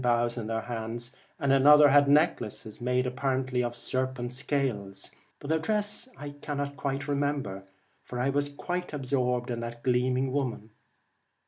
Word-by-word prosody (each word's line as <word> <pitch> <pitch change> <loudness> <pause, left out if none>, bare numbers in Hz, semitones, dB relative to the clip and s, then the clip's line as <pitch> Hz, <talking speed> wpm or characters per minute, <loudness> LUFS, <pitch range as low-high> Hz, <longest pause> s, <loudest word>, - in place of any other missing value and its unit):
93 125 -1 +3
The 120 - +4
boughs 120 +1 0
in 110 - -5
their 115 0 -1
hands, 120 +2 -5 0.2
and 140 -1 +2
another 145 +2 +8
had 145 +1 +6
Twilight, 150 +4 +6
necklaces 110 -2 -7
made 125 +1 +1
apparently 130 0 0
of 120 0 -3
serpents' 125 0 -2
scales, 110 -9 -2 0.3
but 140 - -9
their 160 - +3
dress 210 +7 0
I 145 0 -6
cannot 140 -1 -3
remember, 140 -9 -1 0.4
for 125 - -6
I 130 +2 +1
was 145 +1 +1
quite 180 +4 -4
absorbed 125 -3 0
in 120 - -2
that 115 0 -6
gleaming 130 +1 +1
woman. 125 -5 -2
130 Hz, 160 wpm, -28 LUFS, 120-145 Hz, 0.4 s, another